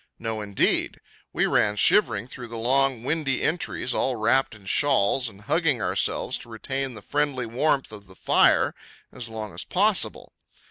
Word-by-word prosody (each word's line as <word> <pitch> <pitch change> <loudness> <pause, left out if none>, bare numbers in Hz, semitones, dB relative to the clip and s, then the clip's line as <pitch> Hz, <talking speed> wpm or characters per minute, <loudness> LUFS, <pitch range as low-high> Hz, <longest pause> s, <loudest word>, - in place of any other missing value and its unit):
No, 110 -1 -4
indeed! 100 -1 0 0.3
We - - +1
ran 105 0 +2
shivering 200 - +3
through 125 -1 -9
the 115 0 -8
long, 130 +1 +1
windy 140 -1 -1
entries, 155 -6 -1
all 130 - 0
wrapped 115 +2 +1
in 105 -3 -17
shawls, 130 0 +2
and 100 -2 -16
hugging 150 +3 +1
ourselves - - 0
to - - -12
retain 130 +3 -4
the 105 - -11
friendly 145 -4 -1
warmth 135 +4 0
of 100 -2 -10
the 95 - -16
fire - - +3 0.4
as 120 -3 -8
long 110 -2 -7
as - - -5
possible. 205 +2 +1
125 Hz, 165 wpm, -24 LUFS, 110-135 Hz, 0.4 s, shivering